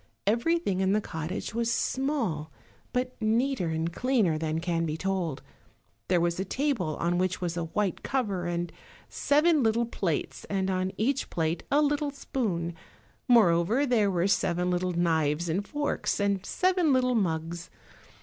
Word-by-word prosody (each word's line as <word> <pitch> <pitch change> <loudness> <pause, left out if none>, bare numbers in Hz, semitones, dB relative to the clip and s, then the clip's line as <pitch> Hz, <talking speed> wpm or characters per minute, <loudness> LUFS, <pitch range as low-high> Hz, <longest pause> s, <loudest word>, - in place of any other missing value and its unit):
Everything 235 - +1
in 190 0 +2
the 210 - +3
cottage 160 -1 -5
was 230 0 0
small, 230 - -1 0.4
but 250 0 -1
neater 230 -1 +1
and 160 +1 -2
cleaner 235 -10 +2
than 155 0 -1
can 165 -1 -1
be 155 -1 -2
told. 180 -5 -2 0.6
There 180 -1 +3
was 170 +1 0
a - - +1
table 205 - -1
on 175 +1 0
which 185 0 0
was 175 -2 -2
a 170 -1 -2
white 190 +2 -1
cover, 200 -10 -1
and 175 0 -2 0.4
seven 300 +2 +3
little 230 0 +2
plates, 155 - -2
and 195 -1 -1
on 185 0 -1
each 265 +5 0
plate 165 0 -1
a 295 +2 +4
little 290 0 +1
spoon; 205 -11 -2 0.5
moreover, 220 +2 +4
there 230 -6 +3
were 180 -2 +1
seven 180 -2 +1
little 180 0 0
knives 165 -1 +1
and 190 +5 -1
forks, 290 -5 -1
and 200 -2 +1
seven 360 - +2
little 255 -1 +3
mugs. 170 -5 -1
190 Hz, 155 wpm, -28 LUFS, 170-250 Hz, 0.6 s, a